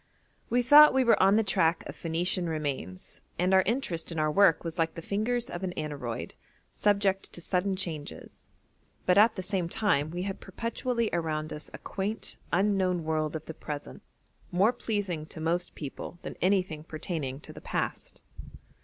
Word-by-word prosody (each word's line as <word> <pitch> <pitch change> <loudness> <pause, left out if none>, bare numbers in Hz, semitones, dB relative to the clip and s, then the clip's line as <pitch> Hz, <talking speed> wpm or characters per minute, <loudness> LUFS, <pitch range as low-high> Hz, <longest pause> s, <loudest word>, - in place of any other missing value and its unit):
We 245 +1 +2
thought 290 +2 +9
we 265 - +4
were 235 - +4
on 195 +2 +6
the 225 - +4
track 170 -5 +2
of - - -7
Phoenician 175 +2 -1
remains 140 - -4 0.2
and 180 +2 +2
our 190 - +7
interest 195 -9 -1
in 165 - -5
our 155 -1 +2
work 190 -1 +5
was 165 0 -5
like 165 0 +1
the 165 - -6
fingers 230 +6 -1
of 175 +2 -6
an 180 -1 -2
aneroid, 145 -7 -4 0.4
subject 200 -2 +1
to - - -6
sudden 185 +2 0
changes, 165 -6 -6 0.6
but 180 +2 +5
at 220 +1 +6
the 185 - -4
same 185 -2 -1
time 170 -8 +1
we 175 +2 -4
had 195 0 -4
perpetually 230 +3 -2
around 155 -2 -1
us 150 - -7
a - - -8
quaint, 205 +3 -4
unknown 185 -2 +2
world 155 -1 -1
of 160 - -5
the 160 - -6
present, 150 -2 -7 0.5
more 195 +7 +4
pleasing 195 -11 -3
to 160 - -10
most 170 +3 -1
people 150 +3 -7
than - - -6
anything 185 -5 +1
pertaining 155 -4 -4
to - - -11
the - - -11
past. - - -4
180 Hz, 175 wpm, -29 LUFS, 160-200 Hz, 0.6 s, thought